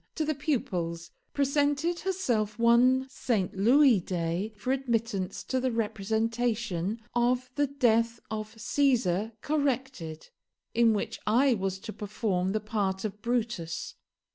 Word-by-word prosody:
to 315 - 0
the 310 - +1
pupils, 175 - -2 0.2
presented 290 +4 +1
herself 240 - -1
one 245 +3 +4
Saint 220 -8 -1
Louis 245 +3 +5
day 175 +3 -2
for 250 +5 -2
admittance 230 -7 -2
to 260 - -1
the 255 0 0
representation 225 -2 -1
of 245 +1 +1
the 290 +1 +1
'Death 235 -4 +2
of 215 +1 -5
Caesar, 225 -5 +1
corrected', 265 - -2 0.4
in 230 -1 +4
which 205 - -3
I 250 +5 +4
was 195 -3 -2
to 215 - -7
perform 195 -3 -1
the 215 - 0
part 205 -2 -2
of 210 0 -5
Brutus. 230 -8 -2
230 Hz, 125 wpm, -29 LUFS, 200-260 Hz, 0.4 s, Louis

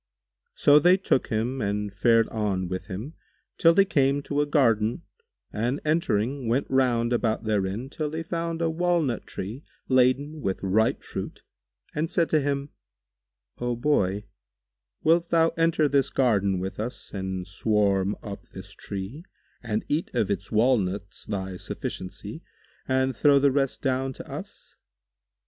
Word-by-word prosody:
So 145 +1 +6
they 180 +5 +5
took 185 -8 +1
him 120 +4 -1
and 105 0 -2
fared 115 +3 +4
on 100 -4 -1
with 95 +1 -5
him 110 - -6 0.5
till 165 - +7
they 195 - +6
came 140 -5 +2
to 145 +1 0
a 145 - 0
garden, 120 -1 +2 0.5
and 120 +7 -1
entering, 135 -5 0
went 125 +4 +1
round 125 -3 +2
about 115 -2 0
therein 105 +2 -1
till 150 +2 -3
they 160 +2 -4
found 165 0 -3
a 165 - +2
walnut 165 -7 0
tree 110 +10 -6 0.2
laden 130 +4 +2
with 95 -4 -2
ripe 105 +4 +2
fruit - - -6 0.5
and 155 +2 -1
said 170 -2 +1
to 155 - +4
him, 140 0 -1 0.9
"O 120 0 -1
Boy, 105 -7 +1 0.8
wilt 170 +2 +3
thou 165 -1 +4
enter 165 -2 +2
this 140 -1 +2
garden 100 -7 +2
with 95 +3 -5
us 120 +4 -5
and 95 -2 -3
swarm 100 0 +1
up 100 -2 -7
this 95 +1 -10
tree 100 - -7 0.4
and 110 -2 -2
eat 155 +3 -1
of 110 -5 +1
its 100 0 -3
walnuts 105 -4 0
thy 95 -3 -3
sufficiency 90 0 -6 0.5
and 130 0 +1
throw 145 +4 +5
the 140 0 +4
rest 135 -1 -1
down 135 0 0
to - - -10
us?" - - -10
125 Hz, 150 wpm, -26 LUFS, 100-145 Hz, 0.9 s, till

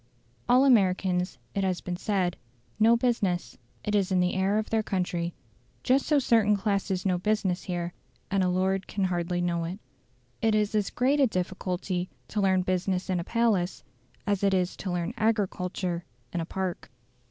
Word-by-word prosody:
All 255 +2 +6
Americans, 185 - +3 0.2
it 195 - 0
has 185 -2 0
been 180 - -4
said, 185 -2 0 0.4
know 230 +2 +6
business; 230 -8 0 0.3
it 210 - -2
is 200 -2 +2
in 185 - +3
the 180 0 +2
air 195 +2 +1
of 215 - -2
their 225 -1 +3
country. 180 -4 -2 0.5
Just 265 +2 +2
so 300 - +4
certain 225 -6 +4
classes 195 -2 -1
know 180 -2 +2
business 195 -2 0
here; 175 -2 -3 0.4
and 195 -1 +2
a 180 - +2
lord 190 +1 0
can 200 - -2
hardly 175 -1 0
know 170 -1 0
it. 175 +3 -5 0.6
It 220 -2 +3
is 210 0 +1
as 210 -2 +1
great 270 +4 +1
a 275 - +5
difficulty 185 -1 -2 0.2
to 210 - -1
learn 190 -1 +3
business 185 +1 -1
in 180 - +1
a - - -2
palace 210 -4 +1 0.4
as 200 -1 0
it 195 -1 +4
is 180 -1 0
to 190 - -4
learn 175 +4 -2
agriculture 185 -5 -1 0.3
in 175 - -1
a - - -3
park. 185 -2 -4
190 Hz, 175 wpm, -28 LUFS, 180-210 Hz, 0.6 s, All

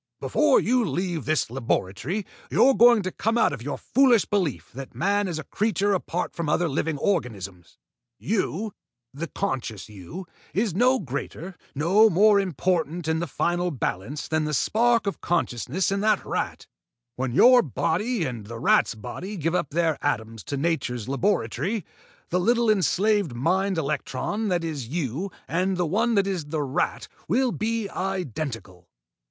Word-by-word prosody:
"Before 300 -3 +3
you 250 +2 +2
leave 175 - -2
this 155 -5 0
laboratory, 130 - -2 0.2
you're 270 - +5
going 235 -3 +6
to 185 - -3
come 225 +5 0
out 225 - +3
of 130 - -6
your 140 +3 -4
foolish 250 -5 +4
belief 185 - -1
that 135 +2 -9
man 205 0 +1
is 170 -3 -3
a 155 - -4
creature 205 +3 0
apart 180 -1 -2
from 170 -3 -3
other 175 +3 +2
living 155 +1 -1
organisms. 100 - -3 0.4
You 210 0 -2 0.4
the 160 +5 -4
conscious 125 - -4
you 105 - -9 0.3
is 205 -1 +1
no 250 +7 +4
greater, 155 - -5 0.2
no 190 +10 +5
more 205 +3 +5
important 175 -1 -1
in 160 0 +1
the 175 - -2
final 175 +5 0
balance 130 - -3
than 155 -1 0
the 150 0 -1
spark 230 - +2
of 200 - -3
consciousness 170 - 0
in 195 - 0
that 215 0 +2
rat. - - -3 0.5
When 130 -1 -2
your 245 - +7
body 180 - -1
and 120 -6 -5
the 115 +1 -7
rat's 115 - +3
body 185 - -7
give 165 0 -1
up 150 - 0
their 160 -1 0
atoms 110 -6 -2
to 140 - -3
nature's 135 -7 -1
laboratory, 165 - -1 0.4
the 180 - +1
little 235 +3 +3
enslaved 200 - +2
mind 185 +8 +1
electron 160 +7 -2
that 175 -3 0
is 150 -7 -4
you 160 - -3 0.2
and 185 +3 0
the 175 - +1
one 225 +8 +1
that 200 -1 +3
is 185 -6 -2
the 150 0 -2
rat 135 -1 -1 0.2
will 245 - +2
be 225 -1 -1
identical." 135 - -4
175 Hz, 160 wpm, -25 LUFS, 140-205 Hz, 0.5 s, your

